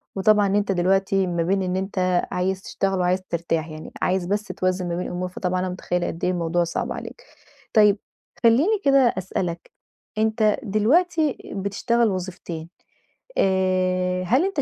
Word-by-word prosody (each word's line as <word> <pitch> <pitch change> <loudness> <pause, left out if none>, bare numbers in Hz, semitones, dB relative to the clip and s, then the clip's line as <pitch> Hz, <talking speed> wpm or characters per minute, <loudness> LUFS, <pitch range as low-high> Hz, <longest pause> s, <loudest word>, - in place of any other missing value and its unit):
وطبعًا 205 +1 +4
أنت 200 0 +1
دلوقتي 190 +1 +2
ما 170 -1 0
بين 195 +3 +1
إن 180 0 -1
أنت 185 -2 0
عايز 185 +1 -1
تشتغل 195 -1 -1
وعايز 180 +1 +1
ترتاح. 165 -1 -1
يعني 155 0 -9
عايز 185 -1 +1
بس 205 +3 -1
توازن 185 -1 -1
ما 170 - -2
بين 180 - -3
الأمور. 180 +1 -3
فطبعًا 180 0 -2
أنا 185 0 -1
مُتخيّلة 180 -1 -2
قد 165 - -6
إيه 180 - +2
الموضوع 175 0 0
صعب 170 - -3
عليك. - - -7 0.5
طيب 210 -2 +5 0.5
خلّيني 300 - +4
كده 275 0 +6 0.2
أسألك، 175 -2 -3 0.5
أنت 220 -1 +2
دلوقتي 300 - +2 0.2
بتشتغل 225 +4 +1
وظيفتين، 175 -3 -5 0.7
آآ 185 -1 +1
هل 255 - +2
أنت 390 -7 -1
185 Hz, 150 wpm, -23 LUFS, 180-210 Hz, 0.7 s, كده